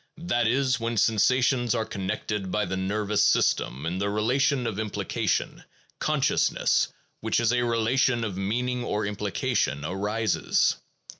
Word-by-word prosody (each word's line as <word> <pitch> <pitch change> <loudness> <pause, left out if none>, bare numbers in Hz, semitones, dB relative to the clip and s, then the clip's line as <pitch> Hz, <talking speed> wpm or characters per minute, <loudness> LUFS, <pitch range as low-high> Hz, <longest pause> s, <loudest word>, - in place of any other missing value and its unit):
That 120 -9 +1
is, 130 +2 +1
when 115 0 -2
sensations 120 +3 +2
are 110 -1 -1
connected 100 -1 -4
by 105 +3 0
the 95 - -3
nervous 105 +2 0
system 65 +3 +1
in 90 +3 -2
the 100 +1 0
relation 125 +5 +1
of 110 -3 -3
implication, 110 -2 -2 0.4
consciousness, - - +1 0.3
which - - 0
is 115 0 +2
a 125 - +2
relation 120 +1 +1
of 105 -5 -3
meaning 120 +6 -1
or 105 -2 -1
implication, 100 -8 -1
arises. 105 +5 0
110 Hz, 135 wpm, -26 LUFS, 100-120 Hz, 0.4 s, sensations